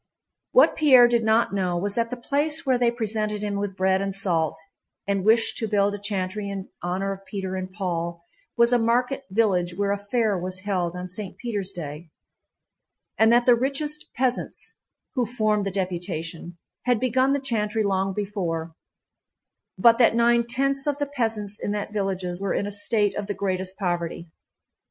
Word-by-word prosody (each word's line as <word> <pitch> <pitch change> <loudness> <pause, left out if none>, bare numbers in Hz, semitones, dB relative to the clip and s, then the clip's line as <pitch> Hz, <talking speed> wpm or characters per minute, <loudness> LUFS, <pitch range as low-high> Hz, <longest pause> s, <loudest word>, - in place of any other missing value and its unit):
What - - +5
Pierre 260 -6 +7
did 235 -1 +1
not 220 -1 +2
know 180 -3 0
was 200 +3 -1
that 230 +1 0
the 250 - -5
place 300 +6 0
where 260 -2 +2
they 240 -1 +4
presented 215 -3 -2
him 205 -1 -2
with 200 -1 -3
bread 190 0 +2
and 195 -1 -3
salt 170 -6 0 0.5
and 200 -1 0
wished 225 +2 +3
to 225 - -1
build 205 -1 +2
a 205 - -5
chantry 200 0 -3
in 195 -1 -6
honor 185 +3 -2
of 195 0 -11
Peter 190 -2 -4
and 185 0 -4
Paul 170 -2 -3 0.3
was 235 +1 +5
a 245 - +4
market 245 +4 +1
village 185 -4 +1
where 200 0 +1
a 200 - -1
fair 215 +1 0
was 185 +1 -4
held 180 -3 -1
on 180 0 -5
St. 185 +1 -5
Peter's 205 -5 -2
day, 160 -1 -7 1.1
and 220 +1 +6
that 240 0 +4
the 245 - +7
richest 285 +5 -1
peasants 255 -1 -2 0.4
(who 250 -5 0
formed 215 -3 0
the - - -2
deputation) 175 -2 -4 0.3
had 245 -3 +2
begun 255 +2 +2
the 280 - +1
chantry 220 -5 -1
long 195 -1 0
before, 180 -5 -3 1.0
but 235 0 +5
that 230 -2 +5
nine 235 0 +3
tenths 275 +3 0
of 290 -1 0
the 290 - -1
peasants 225 -7 -3
in 205 - -2
that 210 0 -4
villages 190 -3 -2
were 195 - -1
in - - 0
a 205 - -4
state 205 0 +1
of 205 -1 -4
the 205 - -3
greatest 190 -1 -2
poverty. 175 -3 -3
205 Hz, 180 wpm, -25 LUFS, 185-235 Hz, 1.1 s, Pierre